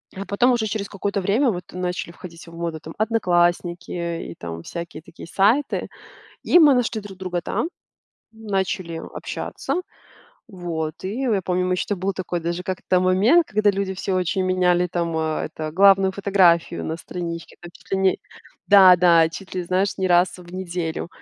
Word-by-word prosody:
А 195 Hz, +1 st, -6 dB
потом, 240 Hz, +6 st, +2 dB
уже 235 Hz, -3 st, +1 dB
через 205 Hz, -1 st, -3 dB
какое-то 200 Hz, 0 st, -2 dB
время 230 Hz, +7 st, +2 dB
вот, 175 Hz, -3 st, -6 dB
начали 180 Hz, -1 st, -4 dB
входить 170 Hz, -1 st, -12 dB
в 165 Hz, -, -13 dB
моду 165 Hz, -1 st, -4 dB
там 160 Hz, +1 st, -11 dB
"Одноклассники", 175 Hz, -5 st, +1 dB, 0.4 s
и -, -, -10 dB
там 85 Hz, -1 st, -7 dB
всякие 170 Hz, -, -7 dB
такие 165 Hz, -, -12 dB
сайты. 220 Hz, +11 st, +1 dB, 0.6 s
И 350 Hz, -, +5 dB
мы 300 Hz, -4 st, +7 dB
нашли 235 Hz, -3 st, 0 dB
друг 195 Hz, -2 st, -11 dB
друга 180 Hz, -2 st, -3 dB
там, 325 Hz, -, -2 dB, 0.6 s
начали 190 Hz, -6 st, -3 dB
общаться. -, -, -5 dB, 0.7 s
Вот, 170 Hz, -7 st, -5 dB
и 205 Hz, +7 st, -3 dB
я 245 Hz, -5 st, +1 dB
я 195 Hz, -, 0 dB
помню, 180 Hz, 0 st, 0 dB
мы 185 Hz, -, +1 dB
еще, 180 Hz, -, -2 dB
там 205 Hz, -, -2 dB
был 195 Hz, +2 st, -1 dB
такой 180 Hz, -2 st, -4 dB
даже 170 Hz, +2 st, -3 dB
как-то 185 Hz, 0 st, 0 dB
момент, 200 Hz, -, +4 dB
когда 210 Hz, 0 st, +2 dB
люди 195 Hz, -1 st, -3 dB
все 190 Hz, 0 st, -3 dB
очень 185 Hz, +1 st, 0 dB
меняли 180 Hz, -1 st, +2 dB
там, 170 Hz, -1 st, -2 dB
э, 160 Hz, -1 st, -1 dB
это, 155 Hz, -1 st, -5 dB
главную 195 Hz, +1 st, +5 dB
фотографию 185 Hz, -4 st, +2 dB
на 160 Hz, -, -3 dB
страничке 170 Hz, -1 st, -7 dB
там 175 Hz, 0 st, -10 dB
чуть 180 Hz, 0 st, -20 dB
ли 195 Hz, -, +2 dB
не 190 Hz, -1 st, +2 dB, 0.5 s
Да, 190 Hz, -3 st, +8 dB
да, 170 Hz, -2 st, +5 dB
чуть 190 Hz, +4 st, -10 dB
ли, 180 Hz, -, -2 dB
знаешь, 185 Hz, +3 st, 0 dB
не 190 Hz, -, 0 dB
раз 175 Hz, +1 st, +3 dB
в 175 Hz, -1 st, -13 dB
неделю. 175 Hz, -3 st, -4 dB
185 Hz, 180 wpm, -22 LUFS, 170-200 Hz, 0.7 s, Да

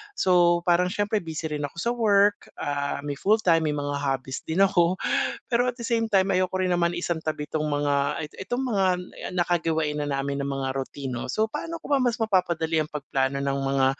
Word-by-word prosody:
So, 175 Hz, -2 st, +4 dB
parang 175 Hz, +1 st, +3 dB
siyempre 205 Hz, +2 st, 0 dB
busy 160 Hz, -1 st, -5 dB
rin 145 Hz, -1 st, -2 dB
ako -, -, -20 dB
sa 235 Hz, -, 0 dB
work, 205 Hz, -3 st, +3 dB
ah, 140 Hz, 0 st, -2 dB
may 145 Hz, 0 st, -4 dB
fulltime 195 Hz, -5 st, +3 dB
may 150 Hz, -, 0 dB
mga 145 Hz, -1 st, -2 dB
hobbies 135 Hz, -1 st, -2 dB
din 170 Hz, +5 st, +3 dB
ako. 180 Hz, -2 st, +3 dB, 0.5 s
Pero 245 Hz, +1 st, +2 dB
at 245 Hz, -, -16 dB
the 235 Hz, -, -4 dB
same 230 Hz, -2 st, 0 dB
time, 195 Hz, -1 st, +3 dB
ayoko 185 Hz, 0 st, +1 dB
rin 185 Hz, -1 st, +1 dB
naman 170 Hz, 0 st, +2 dB
isang 170 Hz, -2 st, -2 dB
tabi 155 Hz, -2 st, -3 dB
'tong 155 Hz, 0 st, -1 dB
mga 145 Hz, +1 st, 0 dB, 0.2 s
itong 245 Hz, +6 st, -2 dB
mga 195 Hz, -4 st, +1 dB, 0.5 s
nakagawain 160 Hz, -4 st, 0 dB
na 145 Hz, -, -2 dB
namin 140 Hz, 0 st, -2 dB
ng 140 Hz, -, -3 dB
mga 135 Hz, -1 st, -2 dB
routine 135 Hz, -1 st, -4 dB
'no, 120 Hz, -, -4 dB
so 220 Hz, +1 st, +1 dB
paano 335 Hz, +8 st, -5 dB
ko -, -, -11 dB
ba 275 Hz, -, +4 dB
mas 245 Hz, -1 st, +1 dB
mapapadali 170 Hz, -7 st, +1 dB
ang 150 Hz, -, -9 dB
pagplano 140 Hz, -2 st, -1 dB
ng 140 Hz, 0 st, -1 dB
mga 135 Hz, -1 st, +2 dB
165 Hz, 200 wpm, -25 LUFS, 145-195 Hz, 0.5 s, So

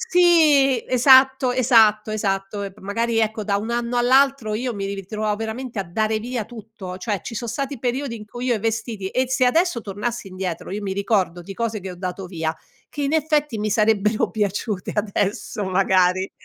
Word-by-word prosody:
Sì 320 Hz, -, +4 dB
esatto, 260 Hz, +1 st, +5 dB
esatto, 225 Hz, -4 st, +4 dB
esatto, 195 Hz, -1 st, -2 dB
e 195 Hz, -1 st, -5 dB
p 210 Hz, -, -22 dB
magari 225 Hz, +4 st, -1 dB
ecco, 220 Hz, 0 st, 0 dB
da 200 Hz, -1 st, 0 dB
un 220 Hz, +3 st, -4 dB
anno 240 Hz, +1 st, -1 dB
all'altro, 255 Hz, -2 st, +3 dB
io 245 Hz, +2 st, -2 dB
mi 200 Hz, -2 st, -4 dB
ritrovavo 210 Hz, +2 st, -3 dB
veramente 225 Hz, +1 st, -4 dB
a -, -, -1 dB
dare 215 Hz, +5 st, -1 dB
via 240 Hz, -1 st, -3 dB
tutto, 215 Hz, -5 st, -9 dB
cioè 195 Hz, +1 st, -2 dB
ci 230 Hz, -, -7 dB
son 235 Hz, +1 st, -4 dB
stati 275 Hz, 0 st, -4 dB
periodi 255 Hz, 0 st, -2 dB
in 215 Hz, -2 st, -8 dB
cui 240 Hz, +4 st, -7 dB
io 245 Hz, -, +2 dB
i 215 Hz, -, -3 dB
vestiti 225 Hz, -3 st, -3 dB
e 255 Hz, +3 st, 0 dB
se 260 Hz, 0 st, +2 dB
adesso 325 Hz, 0 st, +2 dB
tornassi 210 Hz, +2 st, -4 dB
indietro, 185 Hz, -2 st, -5 dB
io 205 Hz, +2 st, -4 dB
mi 195 Hz, -1 st, -3 dB
ricordo 190 Hz, -3 st, 0 dB
di 195 Hz, +3 st, -8 dB
cose 220 Hz, 0 st, -3 dB
che 190 Hz, 0 st, -6 dB
ho 180 Hz, -, -9 dB
dato 185 Hz, +1 st, -5 dB
via, 160 Hz, -3 st, -3 dB, 0.3 s
che 290 Hz, -, -5 dB
in 280 Hz, +2 st, -1 dB
effetti 300 Hz, -6 st, +1 dB
mi 210 Hz, 0 st, -1 dB
sarebbero 215 Hz, 0 st, +2 dB
piaciute 205 Hz, -2 st, -2 dB
adesso, 205 Hz, 0 st, -2 dB
magari. 185 Hz, 0 st, +2 dB
220 Hz, 190 wpm, -22 LUFS, 195-250 Hz, 0.3 s, esatto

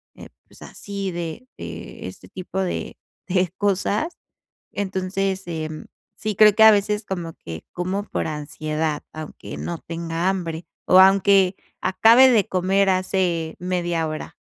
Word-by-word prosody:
eh, -, -, -12 dB, 0.2 s
pues, -, -, -19 dB
así 200 Hz, -1 st, -5 dB
de 175 Hz, +8 st, -6 dB
de -, -, -8 dB
este -, -, -11 dB
tipo 185 Hz, +1 st, -6 dB
de 185 Hz, -, -3 dB, 0.3 s
de 180 Hz, -1 st, +1 dB
cosas. 205 Hz, -, 0 dB, 0.5 s
Entonces, 190 Hz, 0 st, -2 dB
em, 155 Hz, -2 st, -5 dB, 0.3 s
sí 215 Hz, -1 st, -3 dB
creo 210 Hz, +1 st, +7 dB
que 220 Hz, -, 0 dB
a 220 Hz, -, +11 dB
veces 210 Hz, +1 st, +1 dB
como 175 Hz, -5 st, -5 dB
que 80 Hz, -, -9 dB
como 185 Hz, +3 st, -2 dB
por -, -, -3 dB
ansiedad, 155 Hz, 0 st, -3 dB
aunque 155 Hz, -1 st, -8 dB
no 170 Hz, -2 st, -4 dB
tenga 165 Hz, +1 st, -2 dB
hambre, 175 Hz, -3 st, -3 dB, 0.2 s
o 185 Hz, -, +6 dB
aunque 195 Hz, 0 st, +5 dB, 0.3 s
acabe 230 Hz, +7 st, +6 dB
de 225 Hz, -6 st, +3 dB
comer 190 Hz, +2 st, +2 dB
hace 185 Hz, -3 st, 0 dB
media 175 Hz, -2 st, -1 dB
hora. 155 Hz, 0 st, -6 dB
185 Hz, 140 wpm, -22 LUFS, 165-200 Hz, 0.5 s, a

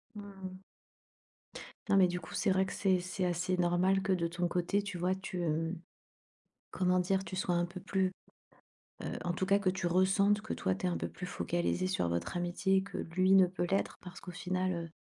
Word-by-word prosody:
Mmh 210 Hz, -, -6 dB
mh. 190 Hz, -2 st, -9 dB, 1.3 s
Non, 200 Hz, -, +4 dB
mais 190 Hz, -2 st, +7 dB
du 180 Hz, 0 st, -3 dB
coup, -, -, -11 dB
c'est 200 Hz, -, +1 dB
vrai 190 Hz, 0 st, +3 dB
que -, -, -5 dB
c'est 190 Hz, -2 st, +2 dB
c'est 185 Hz, +1 st, -3 dB
assez 180 Hz, +1 st, 0 dB
normal 180 Hz, +2 st, +2 dB
que 195 Hz, 0 st, +1 dB
de 175 Hz, -2 st, +1 dB
ton 175 Hz, +1 st, -1 dB
côté 180 Hz, +4 st, 0 dB
tu 200 Hz, -3 st, -5 dB
vois, 180 Hz, +2 st, +1 dB
tu, 190 Hz, -1 st, -5 dB
hem, 165 Hz, +1 st, -1 dB, 0.9 s
comment 185 Hz, 0 st, +2 dB
dire? 190 Hz, +2 st, +1 dB
Tu -, -, -7 dB
sois, 185 Hz, -1 st, 0 dB
un 175 Hz, 0 st, +1 dB
peu 175 Hz, +1 st, -9 dB
plus, 190 Hz, 0 st, 0 dB, 0.9 s
heu, -, -, -3 dB, 0.2 s
en 175 Hz, -, 0 dB
tout 185 Hz, +2 st, -2 dB
cas 200 Hz, +1 st, +4 dB
que 200 Hz, -2 st, 0 dB
tu 185 Hz, -1 st, -3 dB
ressentes 195 Hz, +3 st, +3 dB
que, 215 Hz, -, -4 dB
toi, 95 Hz, -, 0 dB
tu 95 Hz, -, -3 dB
es -, -, +3 dB
un 85 Hz, -, -1 dB
peu 85 Hz, 0 st, -3 dB
plus 85 Hz, -, -7 dB
focalisée 180 Hz, 0 st, -1 dB
sur 185 Hz, -, 0 dB
votre 85 Hz, -, -2 dB
amitié 180 Hz, +2 st, +1 dB
que 200 Hz, 0 st, -7 dB
lui 185 Hz, +3 st, +1 dB
ne 190 Hz, -1 st, +7 dB
peut 180 Hz, 0 st, -3 dB
l'être, 195 Hz, -, 0 dB
parce 180 Hz, -1 st, -10 dB
qu'au 180 Hz, -, -8 dB
final, 185 Hz, +1 st, -1 dB
heu, 170 Hz, -1 st, -4 dB
185 Hz, 220 wpm, -32 LUFS, 175-190 Hz, 1.3 s, mais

